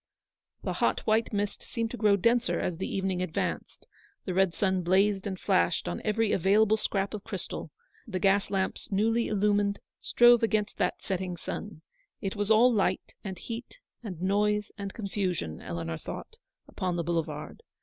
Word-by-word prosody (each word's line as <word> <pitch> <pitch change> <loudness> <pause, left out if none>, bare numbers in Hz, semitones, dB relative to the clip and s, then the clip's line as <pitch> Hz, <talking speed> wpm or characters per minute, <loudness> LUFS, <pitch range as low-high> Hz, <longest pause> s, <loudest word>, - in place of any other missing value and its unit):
The - - -1
hot - - +2
white 220 +1 +1
mist 205 -1 -2
seemed 230 -1 -3
to 245 - -5
grow 210 -3 +4
denser 230 +5 +2
as 175 - -2
the 190 - -3
evening 190 -2 -1
advanced; 185 -3 -3 0.4
the 185 - -2
red 190 0 +3
sun 190 -2 +1
blazed 195 +3 +2
and 190 -2 -4
flashed 85 0 +2
on 85 0 -3
every 215 0 +1
available 205 +4 +4
scrap 200 -2 -1
of 210 -2 -5
crystal; - - -5 0.4
the 190 -4 -3
gas 195 +2 +3
lamps 195 0 -2
newly 225 +4 +2
illumined, 205 -1 +2 0.2
strove 240 -1 +6
against 215 -2 0
that - - -1
setting 185 -2 -2
sun. 170 -1 -6 0.4
It 195 - -3
was 205 0 -1
all 235 +3 +6
light, 205 -3 0
and 190 -3 -5
heat, 230 - -7 0.2
and 195 -8 -7
noise, 210 +3 +1
and 200 -2 -5
confusion, 185 - -3
Eleanor 85 -2 -4
thought, - - -8 0.3
upon 180 -2 -2
the 170 - -1
boulevard. 165 -1 -3
200 Hz, 165 wpm, -29 LUFS, 185-215 Hz, 0.4 s, strove